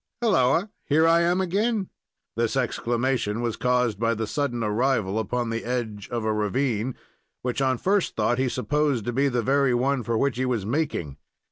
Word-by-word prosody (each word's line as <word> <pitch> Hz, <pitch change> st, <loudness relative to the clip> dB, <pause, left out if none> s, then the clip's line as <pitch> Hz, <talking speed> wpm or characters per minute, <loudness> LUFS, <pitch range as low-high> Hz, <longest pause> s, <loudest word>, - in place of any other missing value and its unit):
"Halloa! 190 Hz, -, +2 dB
Here 160 Hz, +3 st, +3 dB
I 165 Hz, +1 st, +5 dB
am 175 Hz, +2 st, +2 dB
again." 200 Hz, +2 st, 0 dB, 0.4 s
This 115 Hz, +3 st, 0 dB
exclamation 120 Hz, -2 st, 0 dB
was 120 Hz, -2 st, -1 dB
caused 125 Hz, -4 st, +1 dB
by 115 Hz, 0 st, +1 dB
the 110 Hz, +1 st, -2 dB
sudden 120 Hz, -1 st, -2 dB
arrival 110 Hz, -2 st, +1 dB
upon 120 Hz, +2 st, -2 dB
the 115 Hz, 0 st, -3 dB
edge 115 Hz, -4 st, -3 dB
of 120 Hz, -2 st, -2 dB
a 110 Hz, -, +1 dB
ravine, 115 Hz, +2 st, -1 dB, 0.5 s
which, 125 Hz, +2 st, -1 dB
on 130 Hz, -1 st, +2 dB
first 195 Hz, -, +1 dB
thought, 120 Hz, +3 st, +1 dB
he 130 Hz, -1 st, +1 dB
supposed 140 Hz, -2 st, 0 dB
to 120 Hz, -, -2 dB
be 140 Hz, +3 st, +2 dB
the 125 Hz, -3 st, 0 dB
very 135 Hz, 0 st, +2 dB
one 135 Hz, +2 st, +1 dB
for 115 Hz, 0 st, -1 dB
which 140 Hz, +1 st, 0 dB
he 130 Hz, -, 0 dB
was 115 Hz, -6 st, -1 dB
making. 115 Hz, -, -2 dB
125 Hz, 180 wpm, -25 LUFS, 115-140 Hz, 0.5 s, I